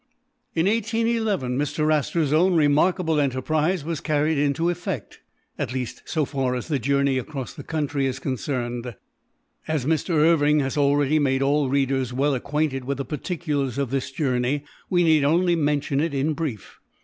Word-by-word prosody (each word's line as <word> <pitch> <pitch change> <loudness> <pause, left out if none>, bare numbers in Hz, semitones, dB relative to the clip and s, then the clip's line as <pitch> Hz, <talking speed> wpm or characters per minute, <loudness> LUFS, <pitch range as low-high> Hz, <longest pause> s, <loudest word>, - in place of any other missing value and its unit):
In 165 +1 +2
1811, 220 - 0
Mr. 155 +1 +1
Astor's 150 0 0
own 175 +3 +4
remarkable 160 +2 +3
enterprise 150 +5 0
was 165 -2 -3
carried 150 -1 +1
into 145 +4 +1
effect 175 +1 -5 0.2
— - - -45
at 125 - -2
least 125 -2 -4
so 155 -3 0
far 130 -2 -1
as 125 - -5
the 145 -3 0
joumey 140 +1 +1
across 135 -1 -6
the - - -9
country 145 -3 -1
is 130 0 -3
concerned. 120 -3 -3 0.7
As 155 -5 -1
Mr. 160 +2 0
Irving 150 -1 +4
has 135 -1 -2
already 145 +1 +3
made 135 -2 +1
all 140 0 +2
readers 135 -2 0
well 140 +3 +1
acquainted 140 +1 -1
with 135 +1 -3
the 135 - -3
particulars 150 -3 -3
of 140 -3 -1
this 135 -1 -1
journey, 135 0 -1 0.3
we 175 -1 +3
need 160 -3 +4
only 170 +4 +3
mention 145 -3 0
it 155 -1 -1
in 145 +3 +1
brief. 145 - -5
145 Hz, 165 wpm, -24 LUFS, 135-160 Hz, 0.7 s, own